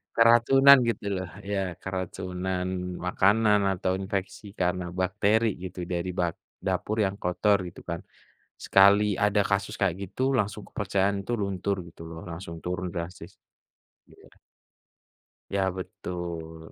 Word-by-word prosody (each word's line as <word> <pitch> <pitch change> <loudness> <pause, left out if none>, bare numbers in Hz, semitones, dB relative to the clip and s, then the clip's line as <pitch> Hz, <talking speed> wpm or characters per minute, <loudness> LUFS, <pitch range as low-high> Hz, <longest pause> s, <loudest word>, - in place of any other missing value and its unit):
keracunan 120 +4 +7
gitu 110 -3 -1 0.2
loh, 95 - -5 0.2
ya 95 -3 -2
keracunan 95 0 -3 0.4
makanan 105 +3 +4 0.2
atau 95 0 -1
infeksi 95 +1 -4
karena 90 0 0 0.2
bakteri 105 +5 +2 0.2
gitu, 90 -1 -5
dari 85 +1 -3
bag 85 -2 0 0.3
dapur 95 +3 -1
yang 95 0 -1
kotor 100 +3 +2
gitu 85 - -11
kan. 85 0 -2 0.6
Sekali 100 +1 +5
ada 105 +1 +2
kasus 100 +2 -1
kayak 95 -4 +2
gitu, 100 +7 -7 0.2
langsung 105 0 -3
kepercayaan 100 -1 0
tuh 120 - 0
luntur 100 0 -1
gitu 85 - -14
loh, 80 0 -8
langsung 85 -1 -7
turun 90 0 -3
drastis. 85 +1 -6 0.8
Ya. - - -18 1.3
Ya 95 - +2 0.2
betul. 85 -3 -6
95 Hz, 125 wpm, -27 LUFS, 90-105 Hz, 1.3 s, keracunan